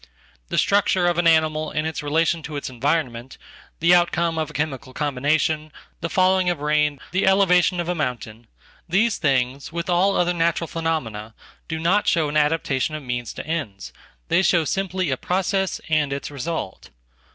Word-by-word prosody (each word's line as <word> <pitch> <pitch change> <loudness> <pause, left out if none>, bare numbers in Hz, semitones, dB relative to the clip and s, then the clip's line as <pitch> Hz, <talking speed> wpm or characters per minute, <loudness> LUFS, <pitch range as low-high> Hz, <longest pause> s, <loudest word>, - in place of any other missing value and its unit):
The - - -2
structure 195 -2 +2
of 175 -1 +1
ananimal 160 -2 +2
and 155 0 0
its 160 -3 -3
relation 160 +3 +1
to 155 -1 -7
its 140 -2 -5
environment, 130 -2 -2 0.4
the 170 +2 +5
outcome 170 -1 +2
of 155 -1 -2
achemical 140 -4 -4
combination, 150 +2 0 0.3
the 170 - -3
falling 185 +1 +3
of 175 -4 -1
rain, 150 -1 +1
the 190 +2 +1
elevation 180 -2 +4
of 170 - -2
amountain, 125 -9 -4 0.4
these 215 +5 +2
things, 135 -2 0
with 170 +2 -3
all 190 +3 +3
other 175 0 +2
natural 165 0 0
phenomena, 120 -11 -3 0.3
do 160 - -3
notshow 170 -2 +2
an 150 - -5
adaptation 150 -1 +1
of 155 - -6
means 120 -3 -4
to - - -7
ends, 145 -12 -4 0.3
they 180 - +3
show 170 -4 +3
simply 185 -1 -1
a 130 - 0
process 190 +2 -1
andits 145 -3 -1
result. 145 - -5
160 Hz, 155 wpm, -22 LUFS, 140-175 Hz, 0.4 s, the